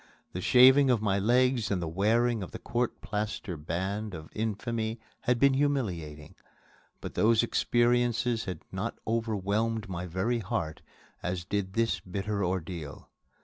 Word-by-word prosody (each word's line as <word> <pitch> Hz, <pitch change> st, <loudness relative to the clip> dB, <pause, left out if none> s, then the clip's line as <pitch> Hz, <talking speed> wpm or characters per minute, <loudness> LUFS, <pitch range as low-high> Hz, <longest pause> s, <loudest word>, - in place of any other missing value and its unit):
The 90 Hz, -, -4 dB
shaving 130 Hz, +5 st, +7 dB
of 120 Hz, -3 st, +4 dB
my 100 Hz, -2 st, +1 dB
legs 120 Hz, +2 st, +2 dB
and 100 Hz, -, 0 dB
the 85 Hz, -, -3 dB
wearing 110 Hz, +6 st, +2 dB
of 95 Hz, -, -5 dB
the -, -, -7 dB
court 120 Hz, 0 st, -2 dB
plaster 105 Hz, -2 st, -3 dB
brand 95 Hz, +6 st, -3 dB
of 80 Hz, -1 st, -10 dB
infamy 110 Hz, +1 st, -2 dB, 0.3 s
had 125 Hz, 0 st, +3 dB
been 140 Hz, +2 st, +4 dB
humiliating, 95 Hz, -, -1 dB, 0.7 s
but -, -, -6 dB
those 115 Hz, +1 st, +4 dB
experiences 120 Hz, -1 st, +1 dB
had 90 Hz, -, -6 dB
not 95 Hz, +5 st, -3 dB
overwhelmed 110 Hz, 0 st, -1 dB
my 90 Hz, 0 st, -4 dB
very 95 Hz, +8 st, 0 dB
heart 85 Hz, -6 st, -3 dB, 0.4 s
as 90 Hz, -1 st, -3 dB
did 100 Hz, -1 st, -2 dB
this 115 Hz, +1 st, +1 dB
bitter 100 Hz, +2 st, -3 dB
ordeal. 85 Hz, -5 st, -4 dB
105 Hz, 145 wpm, -29 LUFS, 95-120 Hz, 0.7 s, shaving